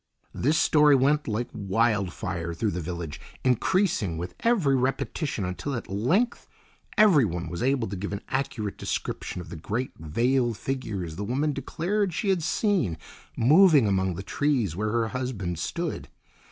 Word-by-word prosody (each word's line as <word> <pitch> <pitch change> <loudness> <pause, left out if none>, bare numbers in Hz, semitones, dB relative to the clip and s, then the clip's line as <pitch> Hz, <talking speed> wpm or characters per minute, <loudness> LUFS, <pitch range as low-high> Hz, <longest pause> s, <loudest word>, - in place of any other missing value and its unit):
This 150 +5 +1
story 150 -2 +5
went 145 +3 +2
like 115 +2 -1
wild 105 -1 +1
fire 85 -4 -4
through 105 +4 0
the 90 - -3
village, 85 -2 -5 0.2
increasing 125 - +1
with 90 +2 -5
every 195 - +3
repetition, 130 - -1
until 90 +10 -3
at 115 - -5
length 170 - +1 0.5
everyone 135 - +4
was 85 - -5
able 130 -2 +1
to 100 - -5
give 100 +2 -4
an 100 +1 -5
accurate 125 -6 -3
description 90 - -3
of 90 - -11
the 90 - -7
great 110 +10 -3
veiled 120 - +1
figures 100 -12 -4
the 100 - -3
woman 140 +8 0
declared 175 +7 -1
she 200 - -1
had 185 -3 +2
seen 165 - +1 0.4
moving 150 - +6
among 95 -3 +1
the 95 - -6
trees 125 - 0
where 105 +3 -1
her 115 -1 +1
husband 110 -10 -3
stood. 80 - -3
115 Hz, 155 wpm, -26 LUFS, 95-145 Hz, 0.5 s, moving